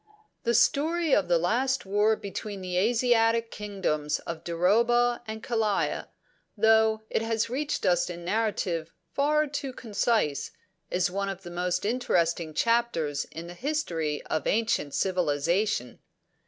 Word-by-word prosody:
"'The 235 0 +2
Story 310 +6 +2
of 195 -3 +3
the 175 -1 +4
last 245 +10 0
war 205 +3 +3
between 200 0 -6
the 180 -1 -4
Asiatic 230 +2 +2
kingdoms 185 -8 -2
of 165 -1 -6
Duroba 235 +8 +2
and 220 0 -6
Kalaya, 220 -4 0 0.5
though 220 0 +4
it - - +1
has 225 0 -1
reached 290 0 -2
us 180 -1 +2
in 175 -1 -6
a - - -10
narrative 180 -5 -1 0.2
far 300 +2 +2
too 280 -1 -4
concise, 215 - 0 0.4
is 180 0 +1
one 200 +1 -2
of 195 0 -6
the 175 - -8
most 180 +1 -1
interesting 175 -9 0
chapters 230 -12 +1
in 165 +1 -9
the 175 - -8
history 175 - -2
of 155 - -2
ancient 220 -10 0
civilisation. 170 - 0
205 Hz, 140 wpm, -27 LUFS, 175-235 Hz, 0.5 s, the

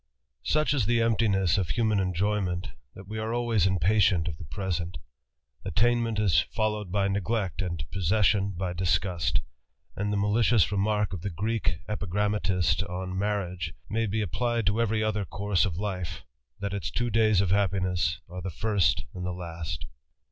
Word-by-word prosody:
OUCH 155 -1 +3
is 130 -8 +1
the 120 0 +3
emptiness 105 -5 +2
of 90 - -1
human 110 -3 +2
enjoyment^ 95 0 0
t - - -7 0.3
hat 95 - -10
wg 110 +3 -5
.are 110 +2 -2
always 115 -6 +2
JTPpaf 95 -3 0
iftnt. 95 -3 +3
of. 75 - -6
the. 85 - -8
prftspnt, 90 +2 -3 0.7
Attainmentig 110 -6 +2
followed 105 -3 -2
by 100 0 +2
neglect, 100 -1 -1
and 85 -5 -3
possession, 95 +2 +2
by 90 -1 -2
disgusfc; 90 -2 +1 0.5
and 105 +1 -1
thr 105 - 0
malicious 105 -2 +3
remark 105 0 +1
of 90 - -4
the 100 - -2
Greek 95 -3 -1
epigrammatist 100 -4 0
on 90 +1 -4
marriag 95 -4 -2 0.2
may 115 +1 +1
be 110 +2 -1
applied 120 +1 -1
to 105 +3 +2
every 110 -1 +1
other 105 -1 0
course 100 0 0
of 85 -5 -3
life, 90 -4 -4 0.4
that 100 -1 -3
its 100 - -2
t? 120 -1 -1
days 110 -2 +4
of 95 -2 +1
happiness 95 -4 +1
are 90 +1 -7
the 95 - -4
first 95 -1 +1
and 90 - -6
the 90 - -2
last. 85 -3 -5
100 Hz, 165 wpm, -28 LUFS, 90-105 Hz, 0.7 s, days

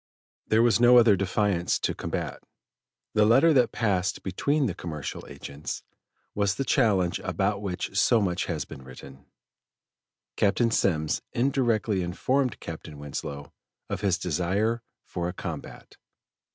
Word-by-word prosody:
There 110 +1 +4
was 115 -3 +4
no 120 +1 +7
other 115 -4 +7
defiance 95 -1 +1
to - - -1
combat. - - -4 0.7
The 105 - +4
letter 135 +10 +5
that 125 -4 +4
passed 95 -5 0
between 140 - 0
the 105 - -1
commercial 75 -7 -6
agents, 70 +2 -7 0.5
was 100 -2 +1
the 135 - -1
challenge 100 -11 +2
about 105 -1 -1
which 100 -1 -4
so 115 +3 +4
much 90 -4 0
has 80 -5 -3
been - - -10
written. 65 +2 -13 1.1
Captain 115 +4 +2
Semmes 80 -8 +1
indirectly 120 -6 +1
informed 125 +9 0
Captain 80 -2 -8
Winslow 70 0 -6 0.4
of - - -2
his 95 -4 +2
desire 95 +6 0 0.2
for 85 -1 -3
a - - -5
combat. 80 -5 -8
100 Hz, 135 wpm, -27 LUFS, 85-115 Hz, 1.1 s, no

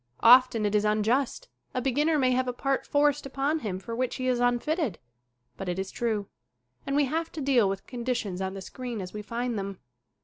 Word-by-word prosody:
Often 240 -2 +7
it 205 - 0
is 210 0 +3
unjust 230 - +1 0.3
a - - +1
beginner 290 +5 +2
may 260 -3 +3
have 255 0 +1
a 250 - -1
part 270 +2 -1
forced 290 -1 +2
upon 275 +4 0
him 205 -9 -3
for 210 +5 -6
which 255 +1 -1
he 255 - -2
is 250 -1 +2
unfitted. 245 - +1 0.6
But 195 -2 -4
it 175 - -2
is 190 0 -3
true. 220 -4 -1 0.6
And 275 - 0
we 290 0 +4
have 320 +4 -2
to 320 - -5
deal 260 -7 +3
with 195 0 -4
conditions 235 -7 -3
on 190 0 -3
the 195 - -6
screen 245 +3 -6
as 180 -2 -6
we 210 - -5
find 235 +1 -3
them. 195 -1 -5
245 Hz, 210 wpm, -28 LUFS, 210-275 Hz, 0.6 s, Often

